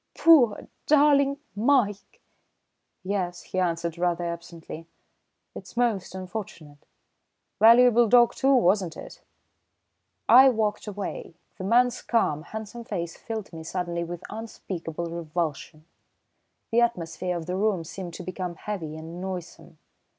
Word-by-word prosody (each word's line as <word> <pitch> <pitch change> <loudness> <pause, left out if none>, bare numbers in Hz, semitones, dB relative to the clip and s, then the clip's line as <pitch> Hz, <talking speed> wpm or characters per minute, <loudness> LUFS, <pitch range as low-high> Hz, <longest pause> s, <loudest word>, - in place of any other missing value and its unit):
"Poor, 275 -11 +5 0.2
darling 285 -2 +4 0.2
Mike!" 215 -3 +1 0.8
"Yes," 185 -2 -3
he 185 - -4
answered 170 -1 -1
rather 175 -1 0
absently. 170 -1 -7 0.7
"It's - - -11
most 220 -7 0
unfortunate. 180 -6 -8 0.7
Valuable 235 +1 +6
dog, 240 0 +6
too, 270 +1 +3
wasn't 185 -7 +2
it?" - - -11 1.1
I 265 +2 +8
walked 220 -3 -1
away. 200 -4 -6 0.2
The 185 - -4
man's 245 +4 +3
calm, 155 -11 0
handsome 220 +6 -8
face 170 -7 -4
filled 220 -5 -7
me 160 -1 -8
suddenly 170 0 -3
with 170 0 -7
unspeakable 180 -6 -6
revulsion. 165 -2 -4 0.9
The 235 +1 +4
atmosphere 180 -5 -1
of 165 - -6
the 180 - -3
room 195 -3 0
seemed 175 +1 -8
to - - -7
become 185 -1 -5
heavy 165 -6 -5
and 165 +3 -8
noisome. 185 -2 -7
185 Hz, 120 wpm, -26 LUFS, 170-225 Hz, 1.1 s, I